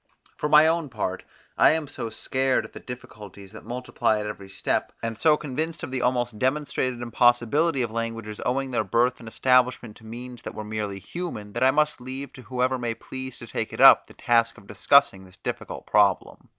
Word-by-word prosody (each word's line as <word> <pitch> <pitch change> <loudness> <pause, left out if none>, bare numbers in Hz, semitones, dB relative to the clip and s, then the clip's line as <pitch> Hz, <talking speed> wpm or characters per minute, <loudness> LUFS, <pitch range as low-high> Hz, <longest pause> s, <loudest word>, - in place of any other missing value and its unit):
For 150 - -2
my 150 +1 +7
own 165 -2 +1
part, 105 -5 -3 0.4
I - - +7
am 160 -2 -2
so 115 -4 -6
scared 130 +4 0
at - - -13
the - - -8
difficulties 105 -6 -10
that - - -11
multiply 120 -3 -1
at 105 - -4
every 100 -2 -7
step, 95 - -1
and 115 0 -2
so 150 +6 +4
convinced 155 +4 -4
of - - -5
the 130 -1 -2
almost 120 -3 0
demonstrated 130 -3 -1
impossibility 120 +5 +2
of 115 - -3
languages 115 -2 -4
owing 135 +1 -1
their 120 - +1
birth 120 +2 +1
and 115 - -11
establishment 125 -2 +1
to - - -19
means 120 +2 -9
that - - -8
were 110 - -5
merely 105 -2 -4
human, 105 - -6
that 120 - -1
I 130 - +6
must 150 -1 +1
leave 130 +2 -7
to 130 - -11
whoever 130 +1 -1
may 120 -2 -2
please 130 +1 -7
to - - -9
take - - -4
it - - -7
up, - - +8
the - - -16
task 115 -1 +2
of - - -15
discussing 105 +1 +3
this 90 0 -16
difficult - - -6
problem. 100 -2 +1
125 Hz, 205 wpm, -25 LUFS, 110-130 Hz, 0.4 s, up